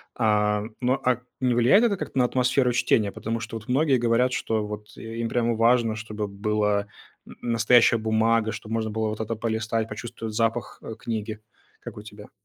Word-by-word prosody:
А, 105 Hz, -2 st, +2 dB, 0.2 s
но, 125 Hz, +1 st, +2 dB
а, 125 Hz, -1 st, +2 dB, 0.2 s
не 125 Hz, -2 st, +1 dB
влияет 125 Hz, -, +5 dB
это 215 Hz, -4 st, +2 dB
как-то 155 Hz, -, -6 dB
на 125 Hz, -, +4 dB
атмосферу 125 Hz, 0 st, +2 dB
чтения, 105 Hz, -4 st, +2 dB
потому 115 Hz, +3 st, -4 dB
что 115 Hz, +1 st, -6 dB
вот 110 Hz, -, -12 dB
многие 135 Hz, +1 st, +3 dB
говорят, 120 Hz, +2 st, +2 dB
что 110 Hz, -3 st, -1 dB
вот 105 Hz, +1 st, -8 dB
им 115 Hz, 0 st, -4 dB
прямо 120 Hz, -1 st, +1 dB
важно, 115 Hz, -1 st, +3 dB
чтобы 110 Hz, -1 st, -5 dB
была 105 Hz, 0 st, 0 dB, 0.4 s
н -, -, -12 dB
настоящая 115 Hz, 0 st, +4 dB
бумага, 110 Hz, 0 st, +1 dB
чтобы 110 Hz, 0 st, -7 dB
можно 110 Hz, -1 st, -1 dB
было 110 Hz, 0 st, -1 dB
вот 105 Hz, -, -5 dB
это 110 Hz, +1 st, -2 dB
полистать, 110 Hz, 0 st, -2 dB
почувствовать 115 Hz, -2 st, -6 dB
запах, 115 Hz, +1 st, -1 dB
э, 110 Hz, -, -7 dB
книги. 110 Hz, -1 st, -4 dB, 0.4 s
Как -, -, -9 dB
у 105 Hz, -, -7 dB
тебя? 105 Hz, -1 st, -13 dB
115 Hz, 185 wpm, -25 LUFS, 110-120 Hz, 0.4 s, влияет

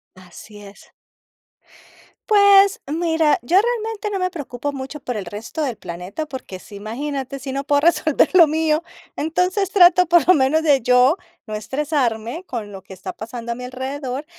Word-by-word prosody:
Así 185 Hz, +3 st, -14 dB
es. 200 Hz, 0 st, -15 dB, 1.4 s
Pues, 400 Hz, 0 st, +6 dB
mira, 320 Hz, 0 st, +1 dB
yo 345 Hz, +11 st, +3 dB
realmente 445 Hz, -2 st, -3 dB
no 400 Hz, -, -2 dB
me 365 Hz, -1 st, -1 dB
preocupo 285 Hz, -5 st, -5 dB
mucho 275 Hz, +2 st, -7 dB
por 250 Hz, -3 st, -4 dB
el 200 Hz, -, -5 dB
resto 210 Hz, -, -6 dB
del 265 Hz, -6 st, -2 dB
planeta, 180 Hz, -, -6 dB
porque 260 Hz, -9 st, -8 dB
sí, 205 Hz, -, -14 dB
imagínate, 270 Hz, +6 st, -5 dB
si 270 Hz, 0 st, -7 dB
no 275 Hz, +1 st, -4 dB
puedo 285 Hz, -1 st, +2 dB
resolver 315 Hz, -2 st, +3 dB
lo 340 Hz, -3 st, +7 dB
mío, 315 Hz, +1 st, +1 dB, 0.4 s
entonces 360 Hz, +5 st, 0 dB
trato 360 Hz, -1 st, +6 dB
por 340 Hz, -2 st, +4 dB
lo 370 Hz, -, +9 dB
menos 300 Hz, +2 st, +2 dB
de 290 Hz, -4 st, +4 dB
yo 250 Hz, +6 st, +4 dB, 0.3 s
no 215 Hz, -, -7 dB
estresarme 255 Hz, -, -2 dB
con 225 Hz, -, -6 dB
lo 195 Hz, -1 st, -9 dB
que 190 Hz, -, -13 dB
está 185 Hz, -, -7 dB
pasando 235 Hz, +2 st, -7 dB
a 235 Hz, -, -3 dB
mi 250 Hz, 0 st, -7 dB
alrededor, 260 Hz, +2 st, -5 dB
280 Hz, 170 wpm, -20 LUFS, 235-335 Hz, 1.4 s, lo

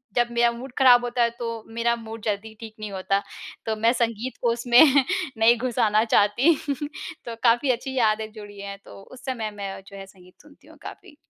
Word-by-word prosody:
जब 240 Hz, -1 st, +3 dB
मेरा 235 Hz, 0 st, +3 dB
मूड 245 Hz, +3 st, -9 dB
खराब 250 Hz, -3 st, +6 dB
होता 245 Hz, 0 st, -1 dB
है, 235 Hz, -, +3 dB
तो 230 Hz, -2 st, -4 dB
मेरा 235 Hz, +1 st, 0 dB
मूड 225 Hz, -1 st, -9 dB
जल्दी 215 Hz, +1 st, -3 dB
ठीक 220 Hz, -1 st, -10 dB
नहीं 215 Hz, -1 st, -6 dB
होता, 195 Hz, +1 st, -1 dB, 0.4 s
तो 220 Hz, -, -1 dB
मैं 225 Hz, +2 st, +2 dB
संगीत 235 Hz, 0 st, -2 dB
को 235 Hz, -, +2 dB
उसमें 240 Hz, +1 st, +3 dB, 0.6 s
नहीं 225 Hz, +2 st, +5 dB
घुसाना 225 Hz, -3 st, +1 dB
चाहती। 235 Hz, +9 st, +3 dB, 0.7 s
तो 230 Hz, -1 st, -6 dB
काफ़ी 240 Hz, +3 st, +3 dB
अच्छी 265 Hz, +2 st, -4 dB
यादें 220 Hz, -2 st, +1 dB
जुड़ी 205 Hz, -2 st, -11 dB
हैं 200 Hz, 0 st, -7 dB
तो -, -, -12 dB
उस 255 Hz, +4 st, -15 dB
समय 235 Hz, -5 st, -3 dB
में 210 Hz, -, -16 dB
मैं 195 Hz, -1 st, -6 dB
जो 200 Hz, -, -11 dB
है 195 Hz, -, -8 dB
संगीत 185 Hz, -2 st, -20 dB
सुनती 295 Hz, 0 st, -21 dB
हूँ -, -, -17 dB
काफ़ी। 295 Hz, -, -11 dB
230 Hz, 200 wpm, -24 LUFS, 210-240 Hz, 0.7 s, खराब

